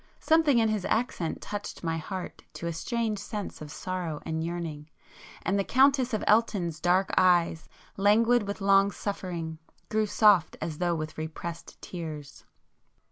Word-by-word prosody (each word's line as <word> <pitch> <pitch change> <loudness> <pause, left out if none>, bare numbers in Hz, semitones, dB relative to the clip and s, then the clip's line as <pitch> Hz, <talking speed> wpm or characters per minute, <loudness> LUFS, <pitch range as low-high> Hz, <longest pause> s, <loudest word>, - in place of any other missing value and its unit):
Something 315 -5 +4
in 225 -1 +4
his 215 -3 -1
accent 220 -8 -1
touched 205 -2 -6
my 165 -1 -1
heart 185 +3 -6
to - - -7
a 170 - -2
strange 220 +5 -2
sense 205 -2 -6
of 150 - -7
sorrow 175 -2 -4
and 160 0 -2
yearning, 165 -3 -5 0.5
and 200 +1 +1
the - - +2
Countess 265 +2 +3
of 215 - -1
Elton's 200 -7 +2
dark 180 +3 +2
eyes, 175 -3 +3 0.3
languid 215 +3 +4
with 200 +1 -4
long 195 0 +5
suffering, 170 -6 -4 0.3
grew 215 -1 +1
soft 205 -5 +4
as 155 -1 -4
though 175 -1 +1
with 155 0 -5
repressed 160 +2 -6
tears. 155 -5 -7
185 Hz, 150 wpm, -28 LUFS, 165-215 Hz, 0.5 s, long